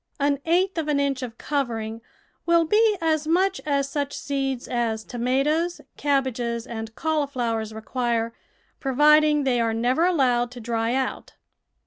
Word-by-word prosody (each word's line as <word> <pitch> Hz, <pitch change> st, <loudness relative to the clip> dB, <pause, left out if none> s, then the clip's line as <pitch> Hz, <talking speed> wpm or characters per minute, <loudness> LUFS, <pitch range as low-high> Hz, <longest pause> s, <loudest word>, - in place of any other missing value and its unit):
An 280 Hz, 0 st, +1 dB
eighth 360 Hz, +2 st, +2 dB
of 310 Hz, -, -3 dB
an 295 Hz, -2 st, +1 dB
inch 275 Hz, -2 st, 0 dB
of 235 Hz, -3 st, -6 dB
covering 230 Hz, -6 st, -3 dB, 0.5 s
will 335 Hz, -1 st, +4 dB
be 425 Hz, +4 st, +3 dB
as 315 Hz, -2 st, 0 dB
much 375 Hz, +4 st, +2 dB
as 280 Hz, -1 st, +1 dB
such 285 Hz, 0 st, -3 dB
seeds 270 Hz, -3 st, -2 dB
as 230 Hz, -3 st, -1 dB
tomatoes, 275 Hz, +9 st, 0 dB, 0.2 s
cabbages, 250 Hz, -5 st, -1 dB
and 225 Hz, -2 st, -7 dB
cauli 315 Hz, -2 st, 0 dB
flowers 230 Hz, -4 st, -2 dB
require, 230 Hz, +1 st, -2 dB, 0.5 s
providing 300 Hz, +2 st, +4 dB
they 250 Hz, -3 st, +2 dB
are 225 Hz, -1 st, 0 dB
never 255 Hz, +9 st, +2 dB
allowed 250 Hz, -8 st, +2 dB
to 245 Hz, 0 st, -10 dB
dry 230 Hz, +1 st, -1 dB
out. 265 Hz, -1 st, -3 dB
270 Hz, 145 wpm, -24 LUFS, 235-300 Hz, 0.5 s, will